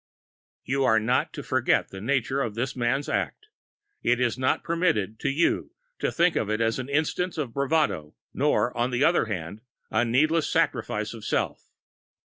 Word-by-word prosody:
You 135 +1 0
are 110 -4 +4
not 120 +4 +1
to - - -6
forget - - +1
the 95 - -9
nature 130 +3 0
of 110 -5 -3
this 125 +3 -2
man's 125 +3 0
act; 435 - -2 0.5
it 125 0 +2
is 120 -3 +1
not 130 0 0
permitted 115 - 0
to - - 0
you 150 +5 +1 0.3
to - - 0
think 175 0 +2
of 105 - 0
it 110 +1 0
as 115 +2 +1
an 130 +1 -5
instance 160 +5 0
of 135 -7 -3
bravado, 140 - 0 0.2
nor, 125 -4 +1
on 120 +1 +1
the 125 +2 0
other 170 -3 +4
hand, 100 -1 -5 0.3
a 110 +2 +2
needless 150 +7 +2
sacrifice - - 0
of - - -10
self. - - -2
125 Hz, 175 wpm, -26 LUFS, 115-145 Hz, 0.5 s, are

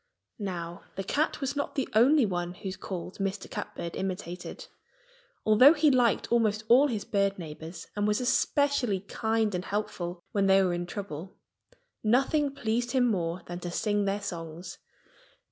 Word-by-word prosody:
Now, 175 -4 -5
the 195 - -3
cat 295 - 0
was 275 +1 -2
not 285 - -3
the 270 - 0
only 255 +5 +5
one 175 -2 -3
whose 190 +1 -5
calls 185 0 -6
Mr. 195 0 -2
Catbird 170 -1 -5
imitated. 180 -2 -5 0.8
Although 250 +9 +7
he 300 -1 +4
liked 245 -4 +2
almost 220 -2 +2
all 260 +5 +7
his 220 -6 -3
bird 200 -1 +1
neighbors 165 0 -8
and 205 0 +1
was 210 0 +2
especially 250 -4 +1
kind 220 +1 0
and 180 0 -2
helpful 180 -4 -3
when 200 -1 +2
they 195 0 +6
were 180 -2 +1
in 175 0 -3
trouble, 190 -2 -7 0.7
nothing 275 +5 +2
pleased 240 -1 -1
him 250 -3 +3
more 175 -2 -2
than 175 0 -6
to 175 - -5
sing 205 +3 0
their 200 +1 -1
songs. 170 0 -6
200 Hz, 160 wpm, -28 LUFS, 180-240 Hz, 0.8 s, Although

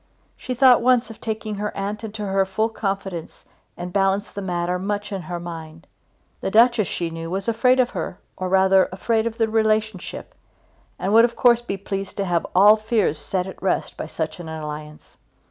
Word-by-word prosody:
She 255 - -5
thought 250 -1 +6
once 240 -2 +3
of 220 - -14
taking 220 -1 -3
her 210 - -3
aunt 205 +2 -3
into 215 -1 -5
her 195 0 +2
full 205 +4 -1
confidence 195 -6 -4 0.3
and 175 0 -6
balanced 195 +1 +1
the 200 - -5
matter 180 -1 -1
much 205 +2 -3
in 195 -2 -3
her 175 -1 -5
mind. 165 -1 -8 0.5
The - - -2
Duchess, 225 -1 +4
she 170 -2 -3
knew, 165 0 -6
was 195 +3 -3
afraid 250 +3 +3
of 250 -1 +3
her, - - -4 0.2
or 185 0 -3
rather 190 0 +4
afraid 220 +4 0
of 230 0 -5
the 225 - +2
relationship, 220 -3 -1 0.6
and 195 +3 -1
would 225 +1 +8
of 235 -1 -3
course 240 -2 +4
be 200 -5 -4
pleased 195 0 -5
to 200 - 0
have 175 -2 0
all 205 +3 +7
fears 215 -8 0
set 185 +2 -2
at 190 - -9
rest 190 - -1
by - - -5
such 160 +2 -4
an 165 -2 -7
alliance. 150 -1 -8
195 Hz, 195 wpm, -22 LUFS, 180-220 Hz, 0.6 s, would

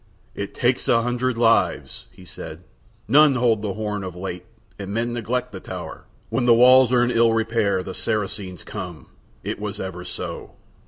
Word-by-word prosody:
"It 100 - -6
takes 125 0 +1
a 115 -1 +3
hundred 125 0 -1
lives," 115 -1 +1
he 90 - -16
said. - - -9 0.4
"None 145 +4 +6
hold 120 -4 +2
the 105 -3 -3
horn 105 -2 -3
of 90 -2 -6
late 90 -1 -6 0.3
and 100 0 -6
men 115 +3 -1
neglect 125 +2 -2
the 95 - -7
tower. - - -8 0.2
When 125 - 0
the 120 - +7
walls 125 +1 +7
are 125 -1 +4
in 120 - +1
ill 115 -1 +4
repair 110 -4 +1
the 95 - -6
Saracens 100 -4 -3
come: 90 -3 -8 0.3
it - - -4
was 105 0 -5
ever 90 -2 -5
so." - - -6
115 Hz, 175 wpm, -23 LUFS, 95-120 Hz, 0.4 s, the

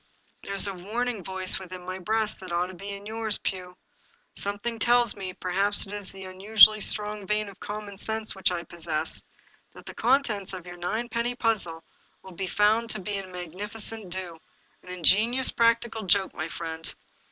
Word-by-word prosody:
" - - -39
There's 200 0 +3
a 200 - -1
warning 215 +4 -2
voice 190 0 -1
within 185 -1 -8
my 185 +1 -4
breast 215 +3 0
that 185 -2 -8
ought 175 +1 +1
to - - -8
be 195 +3 -8
in 200 0 -7
yours, 220 0 -2
Pugh! 180 -1 -4 0.6
Something 205 +3 -3
tells 240 0 +4
me, 190 -2 -4
perhaps 195 +3 +1
it 200 - -9
is 205 -2 -4
the 190 -1 -9
unusually 210 +3 +7
strong 210 -1 -2
vein 210 +1 +1
of 200 -1 -11
common 205 -1 -6
sense 220 +1 -3
which 190 -1 +1
I 175 -1 -2
pos 175 -1 -10
sess, 155 -1 -2 0.5
that - - -13
the - - -7
contents 230 -6 +1
of 180 -2 -7
your 175 0 -9
ninepenny 235 +6 -1
puzzle 195 -9 0 0.4
will 190 - -11
be 190 +2 -3
found 215 +4 +3
to 215 - -2
be 200 +1 -3
a 195 - -7
magnificent 195 +4 -6
do 175 -2 -5 0.2
— - - -37
^an - - -13
ingenious 215 +8 +5
practical 230 -1 +2
joke, 190 +1 +3
my 155 -1 -3
friend." 165 -1 -5
200 Hz, 185 wpm, -27 LUFS, 185-220 Hz, 0.6 s, unusually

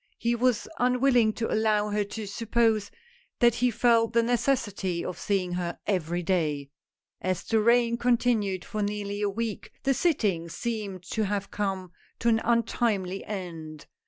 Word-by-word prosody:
He 235 0 0
was 245 -1 +1
unwilling 250 -2 +4
to 225 - -2
allow 215 -1 +2
her 210 0 +1
to 210 +2 -6
suppose 225 0 +1 0.5
that 240 -1 +5
he 250 +2 +2
felt 230 -1 +3
the 235 0 +4
necessity 225 -7 0
of 180 - -5
seeing 190 -3 0
her 175 -1 -3
every 175 -3 -1
day. 150 -6 0 0.5
As 185 -1 -1
the 225 - +1
rain 235 +1 +3
continued 230 -6 +1
for 215 - -4
nearly 205 0 -2
a 205 - +1
week, 220 +1 -4
the 270 - +3
sittings 205 - 0
seemed 210 -6 -4
to 220 -1 0
have 200 0 -2
come 190 -3 -2 0.3
to 235 - +1
an 225 -1 +3
untimely 220 -5 0
end. 165 -6 -6
210 Hz, 155 wpm, -27 LUFS, 190-235 Hz, 0.5 s, that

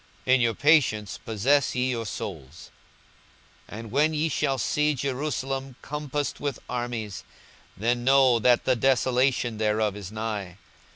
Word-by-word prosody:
42:021:019 130 - +4
In 130 - +4
your 115 -1 +2
patience 125 - +2
possess 125 +7 +1
ye 125 +1 +1
your 115 -2 -3
souls. 80 -7 -7 1.0
42:021:020 105 - -7
And 115 -2 -9
when 150 +5 +2
ye 155 +2 0
shall 135 -1 0
see 150 +5 +1
Jerusalem 135 0 -3
compassed 150 -1 -3
with 140 -3 -3
armies, 120 -5 -4 0.5
then 120 +4 0
know 130 -2 +5
that 120 +2 +3
the 130 - +3
desolation 125 -2 +1
thereof 105 -1 +1
is 100 -2 -8
nigh. 105 -4 -4
125 Hz, 140 wpm, -26 LUFS, 110-135 Hz, 1.0 s, know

